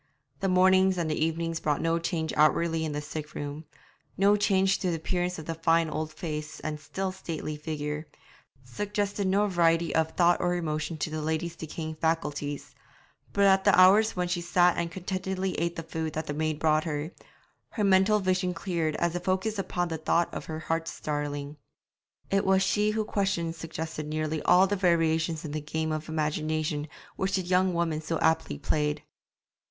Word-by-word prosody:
The 195 - 0
mornings 190 0 +4
and 165 -3 -1
the 155 - 0
evenings 165 0 -1
brought 150 -3 0
no 165 0 +1
change 165 -2 -2
outwardly 160 +2 +3
in 155 - -2
the 145 0 -3
sick 150 0 -7
room, 145 +2 -5 0.5
no 200 +2 +5
change 195 -1 +2
to 185 - 0
the 170 - 0
appearance 180 +2 -2
of 160 - -7
the 165 - -3
fine 165 0 +2
old 155 +1 -3
face 155 -2 -5
and 155 -1 -4
still 185 +6 -3
stately 165 -5 -5
figure, 150 0 -4 0.6
suggested 200 - -2
no 200 +2 +3
variety 170 -3 +2
of 160 0 +1
thought 175 0 +3
or 175 0 +1
emotion 155 -1 -2
to 155 - -3
the 155 0 -3
lady's 160 +2 -2
decaying 160 0 -5
faculties; 150 -3 -2 0.6
but 200 - +2
at 195 -1 +5
the 200 -3 +5
hours 205 +4 +6
when 180 -1 0
she 175 0 -1
sat 175 +1 +3
and 170 0 -1
contentedly 190 +1 -3
ate 170 +1 -1
the 165 - -5
food 160 -1 -4
that 155 0 -3
the 145 - -3
maid 155 0 -1
brought 155 +1 +2
her, 150 0 -3 0.6
her 215 - -2
mental 195 +2 +5
vision 185 -2 0
cleared 170 -4 -1
as 170 0 0
it 175 - -3
focused 190 +3 0
upon 175 -2 -1
the 160 -1 -3
thought 170 +2 +1
of - - -5
her 160 0 -5
heart's 165 +1 -3
darling. 145 -1 -3 0.7
It 195 0 +3
was 190 0 +3
she 210 +2 +2
whose 215 0 -1
questions 195 -6 -1
suggested 160 -2 -5
nearly 155 0 -2
all 180 +2 +5
the 205 +1 0
variations 165 -3 +1
in 150 - -5
the 155 +1 -3
game 160 +1 -2
of 155 0 -4
imagination 155 -1 -1 0.3
which 190 0 0
the 190 - 0
young 180 0 +2
woman 165 -2 0
so 160 +1 -2
aptly 160 -2 +1
played. 150 +1 -1
165 Hz, 185 wpm, -28 LUFS, 155-185 Hz, 0.7 s, hours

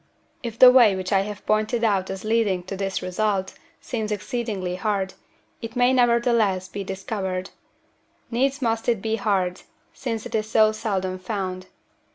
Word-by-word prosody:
If 230 -3 -6
the 255 +1 +10
way 235 -6 +6
which 185 +1 -3
I 195 - +5
have 205 0 -6
pointed 215 +2 +1
out 195 -4 +1
as 190 0 -5
leading 215 -5 +1
to 190 +2 -6
this 195 -1 -3
result 190 +1 -1 0.3
seems 220 -4 -3
exceedingly 210 -4 -3
hard, 195 0 -1 0.5
it 230 -1 -7
may 245 +1 +4
nevertheless 235 -6 +2
be 200 +1 -5
discovered. 190 -1 -4 0.8
Needs 270 +4 0
must 225 0 0
it 230 -3 +2
be 220 +2 -1
hard, 190 -4 0 0.3
since 230 -4 -4
it 240 - -8
is 215 -1 -1
so 215 -1 +5
seldom 190 -4 -2
found. 185 -2 -4
210 Hz, 160 wpm, -24 LUFS, 190-230 Hz, 0.8 s, the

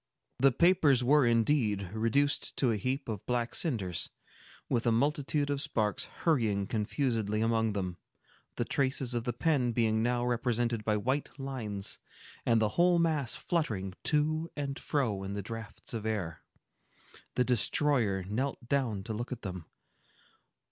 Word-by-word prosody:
The 135 +2 +6
papers 150 -4 +4
were 140 0 +5
indeed 115 -5 +2
reduced 135 +6 +1
to 125 -4 +3
a - - +1
heap 130 +6 -2
of 105 -4 -4
black 120 -1 0
cinders, 100 - 0 0.6
with 120 0 0
a - - +5
multitude 145 +3 +1
of 140 -1 -1
sparks 105 -7 0
hurrying 110 - 0
confusedly 110 -1 -1
among 110 -1 +1
them, 90 -3 -3 0.6
the - - -1
traces 130 -2 0
of 120 -1 -2
the 120 - 0
pen 125 -1 +1
being 110 -2 +2
now 120 +1 +1
represented 120 -2 0
by 105 0 +1
white 130 +7 -1
lines, 115 -8 -4 0.5
and 115 -1 +4
the 110 -1 +2
whole 175 - +3
mass 155 -7 +1
fluttering 110 - -2
to 155 +2 +1
and 140 -2 -3
fro 120 -10 -1
in 95 +1 -4
the 100 0 -4
draughts 115 +2 -7
of 110 -1 -3
air. 90 -7 -3 0.9
The 125 - +3
destroyer 120 -4 +2
knelt 120 +5 -3
down 120 -8 0
to 110 - -4
look 120 +4 -4
at 125 -2 -5
them. 90 -4 -5
120 Hz, 150 wpm, -31 LUFS, 105-140 Hz, 0.9 s, The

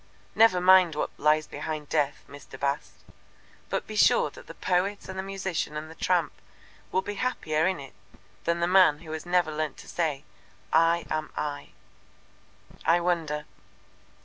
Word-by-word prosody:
Never 220 -5 +5
mind 180 -3 +6
what 150 - -2
lies 150 +1 +3
behind 155 -2 -5
Death, 145 -2 0
Mr. 140 -2 -12
Bast, 140 +1 -2 0.8
but - - -2
be 215 - -8
sure - - +4
that - - -14
the - - -10
poet 185 +3 -1
and 190 - -7
the 190 - -2
musician 190 -6 -3
and 155 +1 -6
the 160 - -15
tramp 175 -4 +1 0.6
will 190 - +1
be 205 - -4
happier 160 -10 0
in 185 -3 -1
it 135 -1 -10 0.5
than 170 0 0
the 170 - +2
man 180 -5 +5
who 160 -2 -9
has 160 +2 -6
never 175 -3 +2
learnt 155 -2 -2
to - - -13
say, 150 -5 -2 0.5
'I 165 +1 +4
am 155 0 -2
I.'" 145 -1 -4 1.1
"I 170 +2 +4
wonder." 165 -4 -1
165 Hz, 165 wpm, -27 LUFS, 150-185 Hz, 1.1 s, mind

